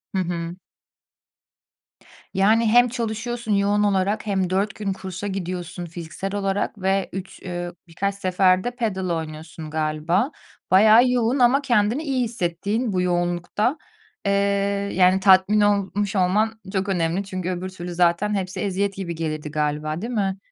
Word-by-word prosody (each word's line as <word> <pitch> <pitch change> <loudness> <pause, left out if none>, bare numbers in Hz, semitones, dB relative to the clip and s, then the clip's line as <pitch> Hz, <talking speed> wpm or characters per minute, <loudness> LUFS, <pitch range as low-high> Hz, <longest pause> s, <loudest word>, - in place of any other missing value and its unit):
Hı - - +1
hı. 170 0 -4 1.8
Yani, 215 +4 +3
hem 245 +2 +6
çalışıyorsun 230 0 -3
yoğun 205 +1 +2
olarak 200 +1 +1
hem 190 -3 0
4 195 +3 0
gün 200 -2 -2
kursa 190 +1 -6
gidiyorsun 180 -2 -4
fiziksel 175 +4 -6
olarak 200 +1 -1
ve 195 0 +1
3 190 0 -7
eee, 175 -1 -4 0.2
birkaç 200 +4 -2
sefer 185 -1 +2
de 245 - -2
padel 175 -9 -3 0.3
galiba. 160 - 0 0.4
Bayağı 220 +6 +7
yoğun. 250 +2 +1
Ama 250 +3 +5
kendini 240 +2 +1
iyi 265 -4 0
hissettiğin 210 +1 -2
bu 180 - +1
yoğunlukta. 175 - 0 0.5
Eee, 200 - +2 0.6
yani, 185 +1 +4
tatmin 195 +2 +5
olmuş 205 0 +1
olman 210 +4 +1
çok 195 +1 -1
önemli. 175 +1 0
Çünkü 185 -2 -4
öbür 185 +1 -3
türlü 175 -1 -7
zaten 180 +4 +2
hepsi 185 -1 -3
eziyet 200 0 -1
gibi 175 -4 -4
gelirdi 155 -2 -4
galiba, 155 +2 -2
değil 240 +2 -4
mi? 195 -3 0
190 Hz, 140 wpm, -23 LUFS, 175-210 Hz, 1.8 s, Bayağı